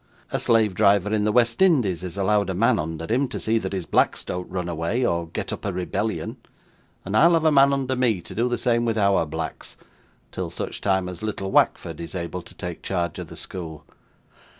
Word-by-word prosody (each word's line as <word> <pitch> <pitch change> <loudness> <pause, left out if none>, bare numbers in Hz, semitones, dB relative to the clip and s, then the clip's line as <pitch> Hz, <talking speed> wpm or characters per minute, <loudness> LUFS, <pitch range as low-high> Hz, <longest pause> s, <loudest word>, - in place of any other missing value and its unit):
A - - 0
slave 110 -3 +3
driver 100 0 +3
in 105 -1 +1
the 105 - +2
West 115 - +2
Indies 125 - +3
is 90 0 -6
allowed 100 0 +2
a 95 - -2
man 115 +1 +3
under 80 +1 -4
him, 125 +8 +1
to - - -5
see 115 +1 +1
that 95 -3 -4
his 95 -3 -3
blacks - - +1
don't 90 0 -4
run 90 -2 -3
away, 85 +9 -1
or 85 -5 0
get 80 - -4
up - - -7
a 100 - -1
rebellion; 90 0 -3 0.7
and 95 +2 -3
I'll 170 +9 +6
have 165 -1 +2
a 155 - +5
man 140 -1 +6
under 135 -1 0
me 120 -6 +2
to - - -10
do 120 +3 0
the 120 - 0
same 120 0 +1
with 115 -1 0
OUR 100 -5 +3
blacks, 80 +1 -6 0.5
till - - -4
such - - -5
time 95 -2 +1
as 90 -2 -7
little 100 -3 -3
Wackford - - +2
is 85 +1 -7
able 90 0 -4
to - - -14
take 90 -2 -6
charge 85 -4 -2
of - - -6
the - - -11
school. 80 -5 -7
100 Hz, 220 wpm, -24 LUFS, 90-115 Hz, 0.7 s, I'll